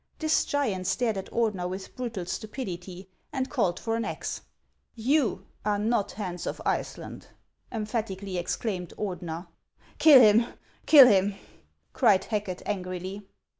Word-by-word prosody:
This 315 Hz, 0 st, +2 dB
giant 215 Hz, -11 st, -1 dB
stared 235 Hz, -4 st, +1 dB
at 190 Hz, -, -6 dB
Ordener 210 Hz, -6 st, 0 dB
with 190 Hz, +1 st, -7 dB
brutal 235 Hz, -8 st, -4 dB
stupidity, 185 Hz, -3 st, -6 dB, 0.2 s
and 265 Hz, -2 st, -3 dB
called 200 Hz, -11 st, 0 dB
for 225 Hz, 0 st, -2 dB
an 230 Hz, -, -1 dB
axe. -, -, -4 dB, 0.3 s
" -, -, -46 dB, 0.2 s
You 285 Hz, -9 st, +2 dB, 0.2 s
are 210 Hz, -1 st, +1 dB
not 215 Hz, 0 st, 0 dB
Hans 185 Hz, -4 st, -5 dB
of -, -, -4 dB
Iceland! -, -, -3 dB, 0.2 s
" -, -, -42 dB
emphatically 210 Hz, -4 st, -3 dB
ex 175 Hz, -, -2 dB
claimed 185 Hz, -7 st, -4 dB
Ordener. 175 Hz, -4 st, -4 dB, 0.3 s
" -, -, -30 dB
Kill 300 Hz, -4 st, +9 dB
him! 225 Hz, 0 st, +5 dB, 0.3 s
kill 285 Hz, -4 st, +10 dB
him! 200 Hz, -3 st, +3 dB, 0.3 s
" 75 Hz, +1 st, -43 dB
cried 195 Hz, -3 st, +4 dB
Hacket, 205 Hz, -4 st, -3 dB
angrily. 185 Hz, 0 st, -4 dB
205 Hz, 150 wpm, -27 LUFS, 185-230 Hz, 0.3 s, kill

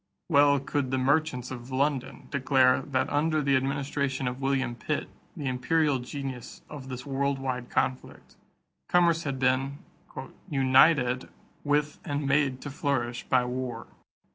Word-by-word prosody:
Well 145 Hz, -2 st, +5 dB
could 135 Hz, 0 st, -2 dB
the 130 Hz, -, 0 dB
merchants 130 Hz, -1 st, +1 dB
of 125 Hz, -1 st, -8 dB
London 135 Hz, 0 st, -1 dB
declare 130 Hz, -2 st, +3 dB
that 135 Hz, -1 st, -1 dB
under 155 Hz, +2 st, +1 dB
the 140 Hz, -2 st, +2 dB
administration 135 Hz, 0 st, -1 dB
of 125 Hz, +2 st, -4 dB
William 135 Hz, -2 st, 0 dB
Pitt, 120 Hz, -, -3 dB, 0.3 s
the 145 Hz, -, -5 dB
imperial 135 Hz, +3 st, +1 dB
genius 130 Hz, -1 st, -7 dB
of 140 Hz, -3 st, -8 dB
this 125 Hz, +1 st, -6 dB
world 140 Hz, 0 st, -1 dB
wide 130 Hz, -2 st, -4 dB
conflict, 130 Hz, 0 st, -3 dB, 0.5 s
commerce 170 Hz, -2 st, +3 dB
had 140 Hz, -2 st, -2 dB
been 135 Hz, +2 st, +1 dB, 0.7 s
"united 130 Hz, -1 st, +4 dB, 0.3 s
with 145 Hz, 0 st, 0 dB
and 145 Hz, 0 st, -2 dB
made 140 Hz, -2 st, +1 dB
to 145 Hz, -, -6 dB
flourish 125 Hz, -4 st, -2 dB
by 125 Hz, -1 st, +3 dB
war." 125 Hz, -2 st, -4 dB
135 Hz, 140 wpm, -27 LUFS, 130-145 Hz, 0.7 s, Well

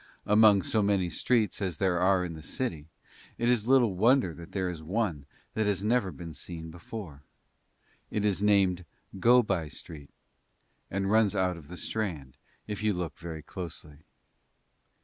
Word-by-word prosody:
Among 105 Hz, -2 st, +6 dB
so 110 Hz, -, +1 dB
many 100 Hz, -4 st, +1 dB
streets 110 Hz, 0 st, +1 dB
as 90 Hz, -5 st, -2 dB
there 90 Hz, -2 st, +1 dB
are 95 Hz, 0 st, +3 dB
in 85 Hz, -, -5 dB
the 80 Hz, -, -9 dB
city 80 Hz, -, -4 dB, 0.5 s
it 120 Hz, -, 0 dB
is 120 Hz, -3 st, +2 dB
little 125 Hz, -6 st, +4 dB
wonder 115 Hz, -2 st, +3 dB
that 85 Hz, +3 st, -11 dB
there 95 Hz, -1 st, -1 dB
is 85 Hz, -3 st, -5 dB
one 85 Hz, -5 st, -2 dB, 0.3 s
that 110 Hz, -1 st, 0 dB
has 100 Hz, -2 st, 0 dB
never 110 Hz, -3 st, +1 dB
been 85 Hz, -2 st, -8 dB
seen 80 Hz, +1 st, -7 dB
before; 85 Hz, -3 st, -8 dB, 0.9 s
it 105 Hz, -1 st, -1 dB
is 100 Hz, -2 st, +1 dB
named 100 Hz, -3 st, +3 dB, 0.4 s
Go 120 Hz, +4 st, +6 dB
by 95 Hz, -7 st, -1 dB
Street 75 Hz, 0 st, -8 dB, 0.8 s
and 95 Hz, +1 st, -1 dB
runs 110 Hz, -3 st, +4 dB
out 90 Hz, -1 st, +1 dB
of 80 Hz, -4 st, -12 dB
the 90 Hz, -, -8 dB
Strand 85 Hz, -, -3 dB, 0.3 s
if 105 Hz, -1 st, -5 dB
you 105 Hz, -1 st, +2 dB
look 90 Hz, -3 st, -4 dB
very 80 Hz, -2 st, -7 dB
closely. 80 Hz, -5 st, -8 dB
95 Hz, 165 wpm, -29 LUFS, 85-105 Hz, 0.9 s, Among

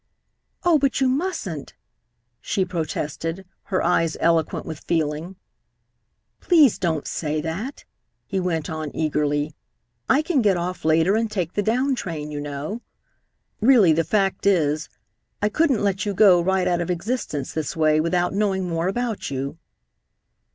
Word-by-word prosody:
"Oh, 340 Hz, -3 st, +4 dB
but 275 Hz, -1 st, +1 dB
you 265 Hz, -, +3 dB
mustn't!" 255 Hz, -, -3 dB, 0.7 s
she 190 Hz, -, 0 dB
protested, 165 Hz, +1 st, -4 dB, 0.2 s
her 185 Hz, -2 st, -1 dB
eyes 165 Hz, -2 st, +1 dB
eloquent 165 Hz, -2 st, +1 dB
with 160 Hz, -2 st, -6 dB
feeling. 160 Hz, +2 st, -2 dB, 1.0 s
"Please 310 Hz, -, +4 dB
don't 160 Hz, -5 st, -1 dB
say 155 Hz, -1 st, -2 dB
that," 175 Hz, -, -5 dB, 0.4 s
he 195 Hz, -, -2 dB
went 170 Hz, -4 st, -1 dB
on 155 Hz, -1 st, -4 dB
eagerly. 150 Hz, -1 st, 0 dB, 0.6 s
"I 290 Hz, +3 st, +4 dB
can 305 Hz, -5 st, +1 dB
get 200 Hz, -4 st, +3 dB
off 180 Hz, +1 st, -4 dB
later 160 Hz, +5 st, +3 dB
and 225 Hz, 0 st, 0 dB
take 180 Hz, -5 st, -3 dB
the 205 Hz, -, 0 dB
down 255 Hz, +6 st, +1 dB
train, 160 Hz, -10 st, -4 dB
you 145 Hz, -, -4 dB
know. 145 Hz, +10 st, -5 dB, 0.8 s
Really, 220 Hz, -8 st, +6 dB
the 165 Hz, +2 st, +2 dB
fact 195 Hz, +3 st, 0 dB
is, 155 Hz, -5 st, +2 dB, 0.5 s
I 210 Hz, -, +1 dB
couldn't 270 Hz, -2 st, +2 dB
let 200 Hz, 0 st, 0 dB
you 205 Hz, -2 st, -2 dB
go 185 Hz, -4 st, +6 dB
right 190 Hz, +1 st, +1 dB
out 175 Hz, -1 st, +1 dB
of 175 Hz, -, -3 dB
existence 175 Hz, -, -3 dB
this 160 Hz, +1 st, -3 dB
way 155 Hz, -1 st, +3 dB
without 175 Hz, +2 st, 0 dB
knowing 195 Hz, -2 st, 0 dB
more 165 Hz, 0 st, -1 dB
about 230 Hz, +1 st, -2 dB
you." 140 Hz, +4 st, -4 dB
180 Hz, 150 wpm, -23 LUFS, 160-210 Hz, 1.0 s, Really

